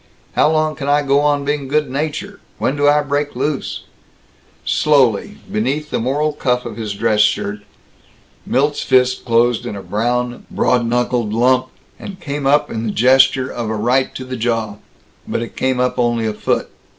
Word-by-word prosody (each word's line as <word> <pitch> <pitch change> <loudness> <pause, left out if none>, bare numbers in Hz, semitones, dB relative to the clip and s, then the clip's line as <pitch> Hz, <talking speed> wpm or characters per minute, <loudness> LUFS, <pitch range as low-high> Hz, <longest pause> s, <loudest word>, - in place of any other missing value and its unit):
How - - +3
long 155 0 +1
can 140 -2 -4
I 145 +1 +3
go 140 0 +3
on 145 -1 +1
being 145 -1 -1
good 150 +2 +1
natured? 155 +9 -4 0.2
When 130 - 0
I 145 +1 +4
do - - -14
break 145 0 -1
loose 135 +2 -3 0.4
" - - -34
Slowly, 145 - +2
beneath 150 -8 -1
the - - 0
moral 145 +5 0
cuff 125 -3 -1
of 115 -3 -6
his 110 -2 -4
dress 110 0 +1
shirt, 105 0 +1 0.8
Milt's 145 +2 0
fist 125 0 +2
closed 120 0 +2
in 120 -4 -5
a 100 - -7
brown, 120 +3 -2
broad 120 -2 +1
knuckled 120 -2 0
lump, 130 +2 +3 0.3
and 195 -2 -8
came 140 -3 -3
up 145 +1 +3
in 115 0 -3
the - - -1
gesture 130 +2 +4
of 115 -2 -4
a 110 - -1
right 125 +5 +1
to 130 - -6
the 130 0 -5
jaw. 115 -3 -1 0.5
But 115 - -2
it 115 - -9
came 130 -1 0
up 125 0 0
only 120 -2 +1
a 110 - -1
foot. - - -1
130 Hz, 185 wpm, -18 LUFS, 120-145 Hz, 0.8 s, I